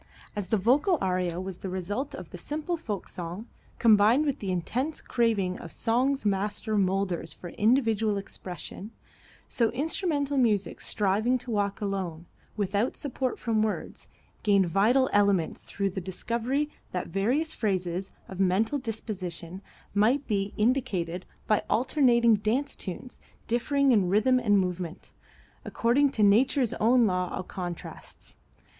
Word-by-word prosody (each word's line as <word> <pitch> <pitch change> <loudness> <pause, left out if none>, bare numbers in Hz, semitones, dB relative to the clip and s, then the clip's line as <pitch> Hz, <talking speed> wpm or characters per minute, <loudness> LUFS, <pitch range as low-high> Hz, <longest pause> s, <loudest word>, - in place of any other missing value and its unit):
As 205 -3 -3
the 220 - +2
vocal 280 - +3
aria 180 -2 -1
was 185 -1 -6
the 190 - -5
result 205 +10 -3
of 180 -2 -9
the - - -7
simple 305 - -3
folk 215 - -5
song 180 +6 -6 0.3
combined 225 +5 +5
with 285 -3 -1
the 195 -2 -3
intense 250 - -2
craving 210 -6 0
of 165 - -9
song's 255 +3 0
master 205 +2 0
molders 190 -4 0
for 175 - -9
individual 220 -1 +2
expression, 195 +1 -7 0.6
so 230 -2 +1
instrumental 290 0 0
music 210 -5 +1
striving 210 +5 +1
to 245 -1 -7
walk 200 -1 -1
alone, 185 -5 -3 0.3
without 205 +3 0
support 260 -2 -2
from 225 -2 0
words, 215 -1 -3 0.3
gained 200 -3 +3
vital 225 +9 +3
elements 200 -5 +2
through 200 -1 -2
the 190 - -4
discovery 235 +10 -1 0.3
that 180 - -2
various 250 - 0
phases 185 -3 -1 0.2
of 190 - -9
mental 200 +9 +2
disposition 190 -7 -5 0.3
might 235 +8 +3
be 200 -2 -1
indicated 210 -8 0 0.2
by 215 - +2
alternating 235 0 +4
dance 225 +7 0
tunes 195 +6 -6 0.3
differing 275 +4 +2
in 200 -6 +3
rhythm 220 +6 +4
and 205 -4 +3
movement, 180 -3 -3 0.5
according 260 +5 +2
to 220 -5 0
Nature's 240 +4 +4
own 240 +2 +5
law 180 -3 0
of 185 - -5
contrasts. 175 -3 -7
210 Hz, 140 wpm, -28 LUFS, 190-250 Hz, 0.6 s, combined